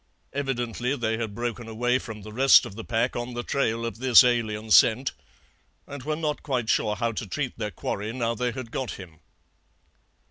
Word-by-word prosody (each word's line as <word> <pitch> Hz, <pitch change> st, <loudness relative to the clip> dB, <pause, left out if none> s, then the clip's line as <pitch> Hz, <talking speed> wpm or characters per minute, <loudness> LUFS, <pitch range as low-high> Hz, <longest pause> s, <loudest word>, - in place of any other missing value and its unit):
Evidently 125 Hz, -2 st, -2 dB
they 110 Hz, -3 st, -1 dB
had 110 Hz, -3 st, -4 dB
broken 120 Hz, -1 st, -4 dB
away 120 Hz, +3 st, 0 dB
from 110 Hz, -5 st, -9 dB
the 105 Hz, +1 st, -10 dB
rest 135 Hz, +4 st, +6 dB
of -, -, -8 dB
the 115 Hz, +2 st, -7 dB
pack 115 Hz, +2 st, 0 dB
on 120 Hz, 0 st, -4 dB
the 120 Hz, -, -3 dB
trail 115 Hz, -4 st, -1 dB
of 115 Hz, -1 st, -5 dB
this 130 Hz, -2 st, +7 dB
alien 110 Hz, -3 st, 0 dB
scent, 125 Hz, +5 st, +5 dB, 0.7 s
and 140 Hz, -1 st, -8 dB
were 150 Hz, +4 st, -2 dB
not 150 Hz, -2 st, -2 dB
quite 125 Hz, -6 st, -2 dB
sure 105 Hz, -1 st, +2 dB
how 115 Hz, 0 st, -1 dB
to 110 Hz, -1 st, -5 dB
treat 130 Hz, +6 st, -3 dB
their 105 Hz, -2 st, -2 dB
quarry 105 Hz, +1 st, -4 dB
now 115 Hz, -1 st, -1 dB
they 125 Hz, +1 st, -1 dB
had 130 Hz, -2 st, -7 dB
got 130 Hz, -2 st, -3 dB
him. 85 Hz, -5 st, -11 dB
120 Hz, 190 wpm, -26 LUFS, 110-130 Hz, 0.7 s, this